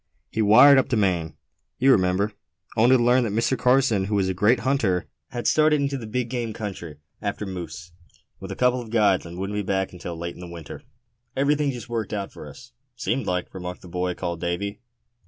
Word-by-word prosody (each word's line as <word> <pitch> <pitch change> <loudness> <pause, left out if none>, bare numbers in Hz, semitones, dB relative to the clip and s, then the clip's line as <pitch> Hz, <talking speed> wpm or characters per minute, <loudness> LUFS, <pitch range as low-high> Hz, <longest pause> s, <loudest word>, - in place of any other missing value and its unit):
He 110 - -1
wired 125 +7 +8
up - - -1
to 120 - +1
Maine, 90 -6 0 0.4
you 135 +2 +5
remember, 95 0 +2 0.4
only 120 +4 +5
to 120 - +1
learn 125 +1 +4
that 115 - -1
Mr. 115 +5 +1
Carson, 125 -5 +3
who 105 +1 -1
was 95 -2 +1
a - - 0
great 105 +7 +3
hunter, 115 -10 +1 0.2
had 120 -2 -5
started 155 -1 +4
into 140 0 -1
the 120 -5 -6
big 125 +2 -2
game 120 -2 -3
country 90 -9 -6 0.2
after 105 0 -3
moose, 90 -1 -7 0.5
with - - -8
a - - -4
couple 125 0 +2
of 115 - -10
guides, 105 -6 +2
and 85 +1 -9
wouldn't 95 +2 -3
be - - 0
back 95 -1 -1
until 90 -1 -7
late 85 +1 -5
in - - -13
the 90 - -7
winter." 85 -3 -9 0.5
"Everything 145 +1 +2
just 125 -2 -6
worked 115 -2 -3 0.2
for - - -10
us, 125 -1 -13 0.2
seemed 130 -2 -2
like," 90 -1 -2
remarked 90 -1 -7
the - - -11
boy 90 +1 -2
called 85 -2 -4
Davy. 100 +4 -3
105 Hz, 210 wpm, -24 LUFS, 90-125 Hz, 0.5 s, wired